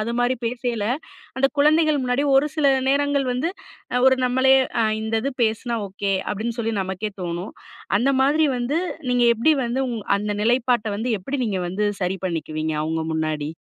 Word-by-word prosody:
அது 225 +2 -2
மாரி 245 +1 +1
பேசைல, 235 -2 -2 0.5
அந்த 265 +1 +4
குழந்தைகள் 305 0 +4
முன்னாடி 250 +3 +1
ஒரு 275 +3 +4
சில 305 -2 +2 0.2
நேரங்கள் 285 -1 +1
வந்து 255 +7 -1 0.5
அ 250 - +2
ஒரு 260 0 +2
நம்மளே 260 +1 +4 0.3
அ - - +3 0.2
இந்தது 225 +4 -1
பேசினா 230 +2 -1
ஓகே, 200 +1 -2 0.2
அப்டின்னு 225 +3 -4
சொல்லி 225 0 -1
நமக்கே 190 +3 -4
தோணும். 175 +2 -4 0.4
அந்த 255 +5 +2
மாதிரி 300 +3 +3
வந்து 250 +6 0 0.3
நீங்க 245 -1 +3
எப்டி 255 +8 +3
வந்து 240 +3 -1
உங் 235 -2 -3 0.2
அந்த 210 +1 -2
நிலைப்பாட்ட 240 0 +2
வந்து 215 - -4 0.2
எப்டி 270 +10 -4
நீங்க 200 -4 -1
வந்து 195 +4 -1 0.2
சரி 180 +1 0
பண்ணிக்குவீங்க 160 -3 -2
அவங்க 160 +1 -2
முன்னாடி? 155 -2 -2
235 Hz, 165 wpm, -22 LUFS, 200-265 Hz, 0.5 s, அந்த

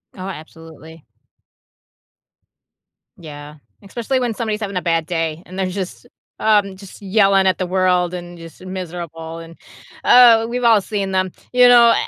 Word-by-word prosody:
Oh, 185 0 -7
absolutely. 160 -2 -12 2.1
Yeah, 150 -2 -11 0.3
especially 235 +6 -3
when 245 -2 -2
somebody's 220 -1 -4
having 200 -2 -4
a 180 - -1
bad 165 -2 0
day, 165 -1 -3
and 185 - -11
they're 190 - -1
just 185 +4 -6 0.3
um, 205 -3 +2
just 195 +1 -14
yelling 195 -1 +3
at 185 - +1
the 185 - -2
world 180 -1 +1
and 175 -1 -8
just 165 +2 -13
miserable, 170 -3 -7
and, 165 0 -12 0.5
uh, 230 -2 +6
we've 245 +1 -3
all 225 -4 +5
seen 200 -2 -4
them. 185 -1 -1 0.2
You 250 0 +6
know 235 -1 +7
185 Hz, 150 wpm, -19 LUFS, 165-210 Hz, 2.1 s, know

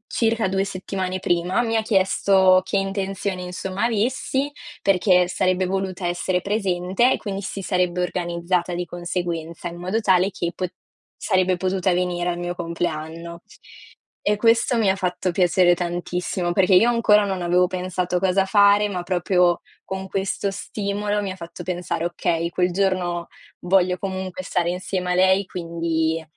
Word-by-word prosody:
circa 225 -2 +1
2 190 +1 0
settimane 185 -1 -3
prima, 180 +5 0
mi 225 -1 -1
ha 220 - +3
chiesto 190 -2 +4
che 195 - -1
intenzione 195 -1 -2
insomma 185 +3 -3
avessi 260 +5 0 0.3
perché 180 -2 +3
sarebbe 185 0 +1
voluta 190 0 -3
essere 175 +1 0
presente, 195 +3 +1
e - - -1
quindi 195 -2 -5
si 195 0 -5
sarebbe 180 -1 0
organizzata 175 0 -1
di 175 0 -2
conseguenza 175 -1 -4
in 170 - -9
modo 185 +5 -1
tale 190 -1 +3
che 175 -3 -3
pot 180 -2 -4 0.5
sarebbe 185 -2 +1
potuta 185 0 0
venire 175 0 -1
al 175 - -2
mio 175 0 -3
compleanno. 170 0 -4 0.8
E 210 - +1
questo 230 +3 +3
mi 210 -4 +3
ha 190 - +1
fatto 180 -1 -1
piacere 175 0 +4
tantissimo, 175 0 -2
perché 190 0 +3
io 230 +6 +6
ancora 210 -3 +4
non 190 -2 -2
avevo 180 +1 +3
pensato 180 -1 -2
cosa 190 +1 +2
fare, 205 +1 +5
ma 180 -2 -3
proprio 180 -1 +2 0.2
con 190 0 -6
questo 195 +1 -1
stimolo 205 +1 -2
mi 195 - -3
ha 185 - -6
fatto 170 0 -9
pensare: 175 -2 -3
"Okay, 170 -1 -1
quel 180 +1 +1
giorno 180 -2 0 0.3
voglio 180 0 +2
comunque 190 -1 -5
stare 175 -1 -1
insieme 180 0 -2
a - - +1
lei". 190 +2 +3
Quindi 165 -2 -2
185 Hz, 155 wpm, -22 LUFS, 175-195 Hz, 0.8 s, io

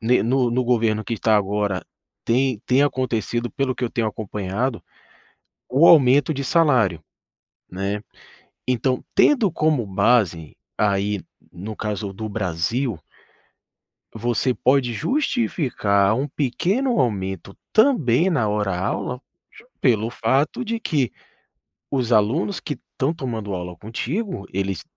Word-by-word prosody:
ne 120 +3 +3
no 125 +1 +1
no 125 +2 0
governo 110 -3 +1
que 115 +3 -3
tá 110 -1 +3
agora 100 -1 -1 0.4
tem 125 -1 +1
tem 130 +2 +4
acontecido, 120 -3 -1
pelo 135 -3 -1
que 125 - -3
eu 115 - -2
tenho 115 -2 -1
acompanhado, 105 +3 -3 0.9
o 145 +7 +5
aumento 145 0 +6
de 140 - -3
salário, 130 - +3 0.7
né. 100 +3 -3 0.7
Então 125 +1 0
tendo 240 -9 +4
como 155 -8 +1
base 95 -5 +1 0.2
aí, 100 0 +1 0.3
no 100 +5 -7
caso, 105 -2 -3
do 110 +2 -6
Brasil 100 +3 -2 1.2
você 120 +3 0
pode 130 -2 +2
justificar 120 - +1
um 135 +3 -1
pequeno 175 - 0
aumento 100 -5 -2 0.2
também 190 - +4
na 120 -11 +1
hora 105 -3 -1
aula, 125 +7 -3 0.3
ju 445 - -17 0.2
pelo 115 -4 +2
fato 135 - 0
de 230 -1 -3
que 140 - 0 0.8
os 125 -3 -1
alunos 120 - +2
que 150 - -4
estão 140 +2 -3
tomando 115 - -4
aula 90 -1 -5
contigo, 120 - -4
eles 95 -1 -2
120 Hz, 125 wpm, -22 LUFS, 105-135 Hz, 1.2 s, aumento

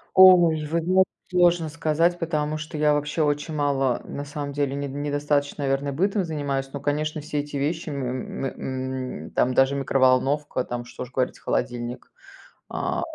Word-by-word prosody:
Ой, 175 -5 +7
вы 165 +2 0
знаете, 185 +3 +4 0.2
сложно 175 -3 +3
сказать, 165 +2 +1
потому 155 -2 -1
что 155 +1 -6
я 150 0 +4
вообще 150 +2 -1
очень 150 +1 -1
мало, 140 -4 +1
на 145 - -6
самом 145 0 -5
деле, 140 -1 -1
недо 140 -1 -4
недостаточно, 145 0 -1
наверное, 140 +1 0
бытом 195 +5 +1
занимаюсь, 140 -4 -2
но, 140 - -5
конечно, 150 +1 -1
все 150 0 -3
эти 145 0 -5
вещи, 155 +4 -1
м, 130 -2 -4
м, 130 - -4
м, - - -13
там 125 +1 +2
даже 135 +2 +3
микроволновка, 135 +1 +2
там, 120 0 -4
что 120 +1 -8
уж 125 - -11
говорить, 130 -1 -1
холодильник. 120 0 -3 0.6
А. - - -2
145 Hz, 165 wpm, -24 LUFS, 135-155 Hz, 0.6 s, Ой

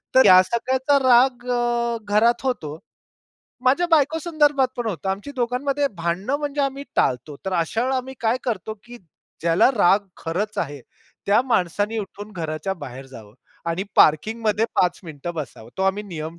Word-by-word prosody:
तर 260 - +7
या 185 -2 +9
सगळ्याचा 260 +7 +1
राग 245 0 +4
अ, 240 -1 0 0.2
घरात 235 +3 +3
होतो. 160 - -3 0.9
माझ्या 280 +8 +3
बायको 315 0 +3
संदर्भात 295 -5 +2
पण 240 - -3
होतं 190 -2 -4
आमची 200 +9 -4
दोघांमध्ये 270 +4 0
भांडणं 175 +10 -1
म्हणजे 290 -1 -3
आम्ही 275 +1 -2
टाळतो. 130 +4 0
तर 190 - -2
अशा 170 +6 0
वेळेला 260 +1 0
आम्ही 260 +1 -7
काय 230 +2 +2
करतो, 220 -3 -3
की 240 0 -11 0.4
ज्याला 165 +8 +4
राग 200 +2 +4
खरंच 200 +6 -3
आहे, 145 -3 -3 0.5
त्या 210 +4 +4
माणसाने 210 -2 0
उठून 205 +1 -7
घराच्या 165 +1 -3
बाहेर 135 -5 -9
जावं 110 -5 -13 0.4
आणि 170 +3 -2
पार्किंगमध्ये 215 +7 +3
5 180 - +2
मिनिटं 160 +2 -7
बसावं. 135 -7 -7
तो - - 0
आम्ही 190 +2 +1
नियम 165 -4 -7
215 Hz, 160 wpm, -22 LUFS, 170-255 Hz, 0.9 s, या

